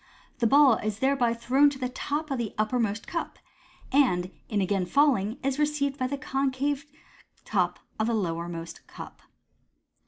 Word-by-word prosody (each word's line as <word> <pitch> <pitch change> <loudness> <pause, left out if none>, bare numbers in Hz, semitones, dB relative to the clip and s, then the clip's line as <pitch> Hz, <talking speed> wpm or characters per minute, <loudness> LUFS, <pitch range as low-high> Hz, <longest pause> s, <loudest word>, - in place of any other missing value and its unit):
The 235 - +3
ball 275 -1 +6
is 215 -1 -2
Fig - - -16
i2 - - -19
thereby 265 -3 +2
thrown 265 +5 +4
to 280 - -7
the 255 -1 -2
top 290 +4 -3
of 265 - -1
the 225 -3 -4
uppermost 215 -1 0
cup, 335 - -4 0.5
and, 190 -10 +2 0.2
in 210 - 0
again 190 -1 0
falling, 245 -4 +2
is 275 +1 -1
received 295 -2 0
by 255 - 0
the 280 +2 -3
concave 275 +1 -1 0.6
top - - 0 0.2
of 220 - +1
the 235 - +1
lowermost 170 -3 -4
cup. - - -11
255 Hz, 165 wpm, -27 LUFS, 210-280 Hz, 0.6 s, ball